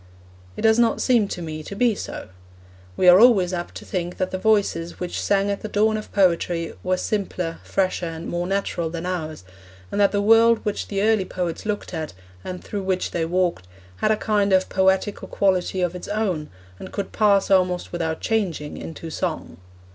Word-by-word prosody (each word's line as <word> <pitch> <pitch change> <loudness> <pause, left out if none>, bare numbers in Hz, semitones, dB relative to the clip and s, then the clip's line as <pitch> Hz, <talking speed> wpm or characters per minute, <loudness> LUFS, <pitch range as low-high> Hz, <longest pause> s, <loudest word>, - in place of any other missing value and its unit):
It - - -5
does 220 +1 +5
not 230 -1 +3
seem 235 -5 +3
to 180 -3 -5
me 155 -1 -5
to 200 - -8
be 235 +2 +3
so. 195 - -7 0.7
We 185 - +3
are 180 +1 +9
always 205 -7 +5
apt 175 -1 -4
to - - -8
think 180 -1 -3
that 185 - -1
the 185 - -3
voices 195 -5 +1
which 180 -1 -3
sang 200 0 +1
at 200 - -3
the - - -4
dawn 215 +1 +2
of 215 - -6
poetry 170 -3 +1
were 185 0 0
simpler, 180 -5 -3
fresher, 185 -2 -1
and 165 +1 -6
more 175 +1 -2
natural 190 -4 -1
than 165 +1 -5
ours, 160 - -4 0.5
and 205 - 0
that 200 - +4
the 205 - 0
world 225 +2 +5
which 210 - -2
the 200 -1 -1
early 215 -3 +3
poets 180 +2 -4
looked 205 -3 -3
at, 160 -2 -4 0.3
and 180 -1 -6
through 205 - -4
which 185 -1 -1
they 165 -1 -1
walked, 175 - 0 0.3
had 215 - +1
a 215 - +3
kind 205 -2 +1
of 185 0 +3
poetical 190 +2 +1
quality 185 -1 +1
of 180 -1 0
its 180 - -7
own, 200 -8 -1 0.3
and - - -9
could 200 - -4
pass, 200 -3 +3
almost 180 -2 +2
without 160 -2 -2
changing, 180 -10 -1
into 165 0 -7
song. 80 - -4
185 Hz, 195 wpm, -23 LUFS, 175-205 Hz, 0.7 s, are